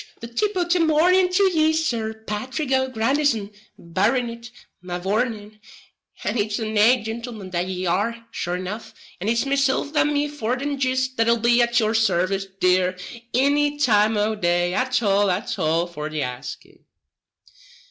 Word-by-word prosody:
the - - -7
tip 410 - -1
o' 355 - +2
the 350 +1 +1
mornin' 350 +4 +3
to 380 +2 +3
ye, 315 -1 +3
Sir 240 -9 -1
Pathrick 240 +6 -4
O'Grandison, 260 -3 +1 0.3
Barronitt, 235 +7 -1 0.3
mavourneen; 205 +4 -3 0.6
and 240 - -1
it's 205 0 -1
a 225 - -3
nate 220 +2 +3
gintleman 225 -4 -6
that 175 0 -1
ye 185 0 -4
are, 230 +6 -1
sure 175 -5 -3
enough, 185 +5 -6 0.2
and 195 +5 -2
it's 230 +3 +1
mesilf 275 +2 0
and 295 0 +3
me 290 0 +1
forten 275 0 -3
jist 260 0 0
that'll 230 +1 +3
be 235 +1 +3
at 235 0 +3
yur 220 -1 +1
sarvice, 195 -3 +1
dear, 185 0 +2 0.3
inny 290 +3 +2
time 220 -6 +3
o' 210 +1 +1
day 175 -3 0
at 255 +1 0
all 200 -1 +3
at 180 - -2
all 165 +2 +1
for 155 -3 -6
the 155 -2 -2
asking." 125 -1 -8
230 Hz, 155 wpm, -23 LUFS, 195-265 Hz, 0.6 s, mornin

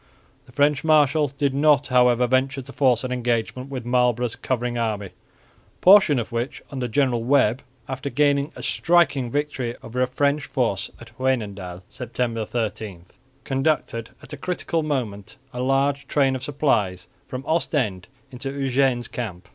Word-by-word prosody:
The - - -16
French 145 +1 +2
marshal 155 -1 +4
did 140 0 -1
not, 145 -1 +4
however, 125 -1 +4
venture 130 +2 +1
to 135 +2 -12
force 130 -4 +2
an 130 - -3
engagement 125 +1 -1
with 130 -3 -5
Marlborough's 125 -1 +1
covering 125 -1 -2
army, 110 -4 -1
a - - -33
portion 185 -7 +7
of 115 - -3
which 120 +3 -3
under 130 -3 -3
General 120 -1 +1
Webb, 130 -1 +3 0.3
after 130 +1 -4
gaining 145 +1 +2
a - - -9
striking 145 -7 +2
victory 130 -3 -2
over 125 +2 -3
a 130 - +3
French 140 +3 0
force 120 -8 -1
at 115 -1 -14
Wynendael, 100 -8 -2
(September 115 -2 -3
30), 110 -5 -4 0.4
conducted 135 -4 -1
at - - -11
a - - -5
critical 170 +1 -2
moment 120 -10 -3 0.2
a 125 - -4
large 135 +2 +1
train 135 -2 +2
of 130 - -5
supplies 105 - 0 0.2
from 130 +1 -6
Ostend 130 - -1 0.2
into 130 +2 -5
Eugene's 135 -2 +1
camp. 95 -7 -6
130 Hz, 155 wpm, -23 LUFS, 120-140 Hz, 0.4 s, portion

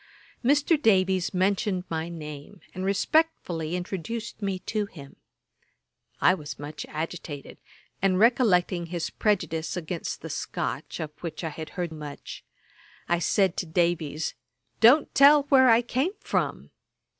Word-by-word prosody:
Mr. 290 +4 +3
Davies 190 - +3
mentioned 190 0 0
my 160 0 -3
name, 150 +2 -9
and 185 - -5
respectfully 195 - 0
introduced 205 +6 -5
me 195 -2 -1
to 210 +2 -3
him. 140 -7 -12 1.0
I - - +5
was 150 -5 -6
much 145 +1 -7
agitated; 155 -2 -6 0.4
and 190 -1 +3
recollecting 190 -6 +3
his 170 -1 -3
prejudice 170 -5 -1
against 170 0 -5
the - - -6
Scotch, - - -4
of 155 -1 -4
which 165 -1 -6
I 160 - -1
had 155 +1 -7
heard 175 -2 -2
much, 150 -2 -8 0.6
I 175 0 +2
said 190 +1 +2
to 175 - -2
Davies, 160 -2 0 0.5
'Don't 260 +7 +6
tell 285 +1 +7
where 260 -2 +6
I 230 +1 +5
come 270 - -1
from.' - - -2
180 Hz, 135 wpm, -26 LUFS, 160-220 Hz, 1.0 s, tell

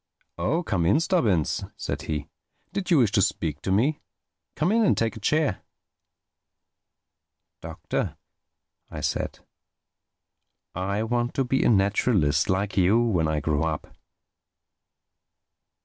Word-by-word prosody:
"Oh—come 95 - 0
in, 100 - +4
Stubbins," 120 - +1
said 70 0 -4
he, 75 +1 -4 0.5
"did 195 -2 -3
you 170 - +5
wish 115 -7 +4
to 100 - +3
speak 75 -5 -1
to 95 - -2
me? 130 +10 +2 0.6
Come 155 +6 +1
in 230 +1 +3
and 205 - +3
take 115 -1 0
a - - -8
chair." 145 -1 +1 2.0
"Doctor," - - -4 0.7
I - - -7
said, - - -2 1.3
"I 100 +4 -2
want 120 +2 -1
to 135 - +2
be 130 +2 +1
a - - +3
naturalist—like 100 -2 +2
you—when 95 -2 +3
I 75 -1 -1
grow 75 0 0
up." 80 -2 -3
100 Hz, 115 wpm, -25 LUFS, 85-130 Hz, 2.0 s, you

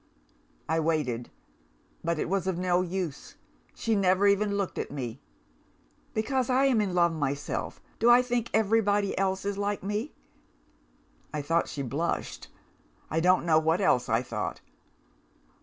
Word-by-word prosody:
I 160 +1 +1
waited; 150 -7 -1 0.7
but 170 0 0
it - - -1
was 190 0 -1
of 185 -2 0
no 180 0 +2
use 180 -4 -4 0.4
she 225 -1 0
never 190 0 +3
even 200 0 +3
looked 200 -2 -2
at - - -3
me. 130 -3 -6 0.9
Because 250 +3 0
I 260 +2 +3
am 250 -5 +3
in 190 -3 -2
love 170 -1 +3
myself, 145 -2 -3 0.2
do 235 - +4
I 245 +1 +7
think 240 -2 -1
everybody 205 -2 +2
else 190 0 -1
is 200 0 -2
like 205 -1 -2
me? 210 +8 -3 1.2
I 150 -2 -3
thought 165 +3 +1
she 140 - -4
blushed. 145 +7 -3 0.6
I 160 - +1
don't 180 +1 +3
know 160 -2 +5
what 160 +3 +1
else 125 -11 +2
I 115 +2 +2
thought. 105 -5 -4
185 Hz, 150 wpm, -28 LUFS, 155-205 Hz, 1.2 s, I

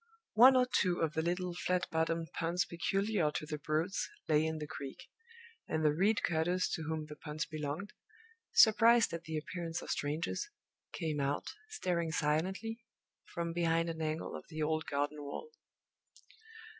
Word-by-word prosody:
One 255 +4 +8
or 255 -1 +5
two 185 -8 +1
of 160 -2 0
the 160 - +1
little 180 +2 -1
flat 180 +1 0
bottomed 165 0 0
punts 170 +1 0
peculiar 195 0 0
to - - -2
the 150 0 -4
Broads 160 +6 -1 0.2
lay 155 -1 +4
in 160 0 -2
the 150 - -4
creek; 140 -3 -7 0.7
and 160 0 0
the 150 - +5
reed 200 +7 +2
cutters 175 +2 +1
to - - -2
whom 160 -1 -2
the 150 0 -9
punts 155 +1 -4
belonged, 155 +5 -4 0.6
surprised 230 -1 +6
at 170 0 -5
the 160 -1 -3
appearance 165 +1 -4
of - - -4
strangers, 145 - -2 0.4
came 155 -2 -2
out, 140 +1 -1 0.2
staring 175 - -1
silently, 185 +10 0 0.5
from 170 -2 -2
behind 165 0 +1
an 160 0 -6
angle 155 +1 -2
of - - -8
the 155 -1 -3
old 155 +1 0
garden 145 +1 -1
wall. 145 - -6
165 Hz, 160 wpm, -34 LUFS, 155-180 Hz, 0.7 s, One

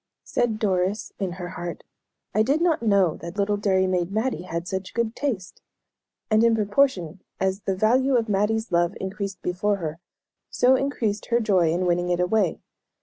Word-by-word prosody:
Said 230 -3 0
Doris 195 -1 -1
in 190 -3 -2
her 180 -1 -6
heart, 175 -1 -6 0.5
"I 215 - +3
did 275 +8 +2
not 335 -5 +2
know 200 -7 +3
that 170 +4 -8
little 205 +1 +1
dairy 195 -2 +2
maid 180 -1 0
Mattie 220 +1 -1
had 170 +1 -3
such 190 0 -4
good 235 -1 -1
taste;" 225 -11 -3 0.7
and 215 +1 +5
in 230 -1 +4
proportion 205 - +1 0.2
as 190 0 0
the 195 - -1
value 255 +7 +3
of 235 -2 +2
Mattie's 215 +2 0
love 175 +1 +2
increased 195 -1 -5
before 195 +4 0
her, 165 -4 -5 0.5
so 255 +1 +4
increased 235 -6 -1
her 235 0 +2
joy 190 -8 +2
in 180 +2 0
winning 175 0 +1
it 175 0 +1
away. 180 0 +1
200 Hz, 175 wpm, -24 LUFS, 180-220 Hz, 0.7 s, and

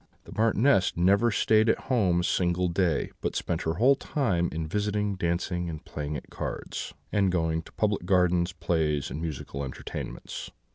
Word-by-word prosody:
The - - -13
Marchioness 110 -3 +3
never 100 +7 +4
stayed 110 0 +3
at - - +4
home 95 -9 +2
a - - -3
single 90 0 +1
day, 85 -3 +1
but - - -2
spent 85 - -1
her 80 0 -1
whole 130 +5 +5
time 95 - 0
in 80 0 -3
visiting, 105 +2 0
dancing, 85 -1 -1
and 80 -2 -7
playing 75 0 -4
at - - -11
cards, - - -5 0.2
and 100 -3 +2
going 80 -2 0
to - - -16
public 105 -4 0
gardens, 90 -1 +3
plays, 80 -5 0
and 80 - -4
musical 70 -3 -4
entertainments. 65 -2 -6
90 Hz, 170 wpm, -28 LUFS, 80-105 Hz, 0.2 s, whole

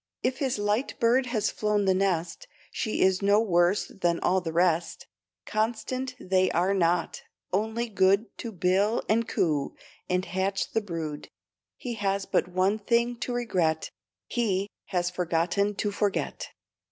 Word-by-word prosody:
If 255 +1 0
his 265 -5 0
light 205 +5 -1
bird 250 +3 +3
has 220 -4 0
flown 210 -1 0
the 190 - +4
nest, 185 - -1 0.2
She 215 - -2
is 190 0 +3
no 200 +1 +4
worse 180 -2 +2
than 175 -3 -1
all 185 +1 +2
the 165 -2 -4
rest; 170 0 +1 0.4
Constant 240 +4 -2
they 185 0 +2
are 180 +4 +1
not, 175 -2 +1 0.3
only 220 +4 0
good 200 +1 +2
To 230 - -5
bill 190 +4 +1
and 225 +1 +2
coo, 150 -9 0 0.3
and 180 +1 +1
hatch 195 +1 -1
the 225 - +1
brood. 165 -6 -5 0.5
He 245 - -5
has 200 -2 -1
but - - +1
one 185 +4 +1
thing 235 +3 +1
to 245 - -4
regret, 185 -10 0 0.3
He 200 -4 -1 0.2
has 180 -2 -1
forgotten 180 +3 0
to 205 +1 -1
forget. 200 0 -2
195 Hz, 150 wpm, -27 LUFS, 180-220 Hz, 0.5 s, the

